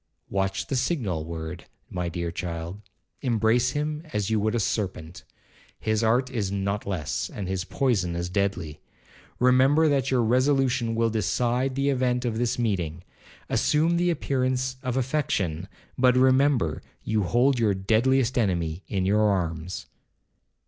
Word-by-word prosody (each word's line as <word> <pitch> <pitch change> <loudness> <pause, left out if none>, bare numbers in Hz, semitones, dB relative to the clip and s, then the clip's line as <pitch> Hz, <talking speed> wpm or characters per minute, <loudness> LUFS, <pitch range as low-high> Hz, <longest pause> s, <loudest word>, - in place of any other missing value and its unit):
Watch 95 0 -1
the 140 - -3
signal 120 - -1
word, 80 +1 -6 0.3
my 90 -1 -2
dear 85 0 -3
child; 85 +1 -5 0.4
embrace 120 0 +2
him 150 +1 -2
as 105 0 -1
you 110 - +2
would 110 +2 0
a - - +1
serpent,—his 100 +3 -4
art 125 +4 +2
is 105 -6 -2
not 100 +1 -2
less, 90 -7 -2
and 100 -3 -6
his 95 -1 -2
poison 95 -6 0
as 85 +1 -2
deadly. 90 -5 -2 0.6
Remember 130 +5 +4
that 140 -2 +1
your 125 -2 +2
resolution 125 -1 +2
will 115 0 +1
decide 120 +5 0
the 140 +1 +1
event 125 -2 +1
of 115 -2 -1
this 120 -1 0
meeting. 90 -8 -1 0.4
Assume 160 +3 +2
the 175 +1 +2
appearance 130 -4 -1
of 130 -1 -2
affection, 105 - -1 0.3
but 125 0 +5
remember 130 - +3 0.2
you 110 -1 0
hold 120 +7 +2
your 105 -4 +2
deadliest 120 +6 +2
enemy 85 -4 -1
in 95 -2 -1
your 105 +3 +3
arms.' 90 -2 -2
110 Hz, 140 wpm, -26 LUFS, 95-130 Hz, 0.6 s, but